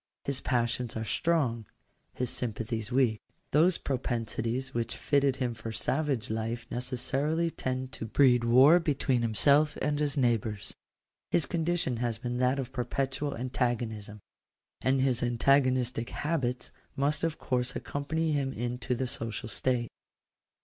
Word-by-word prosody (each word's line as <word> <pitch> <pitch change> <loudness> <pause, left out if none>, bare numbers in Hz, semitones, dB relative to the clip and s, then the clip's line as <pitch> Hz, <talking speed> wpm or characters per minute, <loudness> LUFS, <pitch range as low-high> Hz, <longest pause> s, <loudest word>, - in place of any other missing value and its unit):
His 140 -2 -2
passions 120 -1 0
are 110 - -3
strong; 125 - 0 0.5
his 125 -1 -1
sympathies 115 -1 -3
weak. 120 -4 +2 0.3
Those 165 +5 +4
propensities 120 0 -2
which 115 -1 -2
fitted 140 -2 +2
him 125 -3 -1
for 115 0 -6
savage 130 -1 -1
life 115 +2 -3
necessarily 140 +6 0
tend 130 -2 -3
to 115 - -5
breed 125 0 +4
war 130 +8 +7
between 140 -6 +1
himself 140 +7 +3
and 145 +1 0
his 145 -1 0
neighbours. 110 -5 0 0.6
His 165 - +2
condition 165 -7 0
has 120 -1 -1
been 120 +1 -3
that 130 +2 +2
of 130 -1 -4
perpetual 135 +3 -2
antagonism; 115 -4 -2 0.6
and 130 0 +2
his 130 -3 +2
antagonistic 125 -1 +2
habits 135 -6 -2 0.2
must 145 +3 +1
of 165 -1 0
course 125 -1 -1
accompany 145 +5 -2
him 140 -3 0
into 125 +2 -2
the 130 - -1
social 115 -3 -4
state. 120 +2 0
125 Hz, 135 wpm, -29 LUFS, 115-140 Hz, 0.6 s, war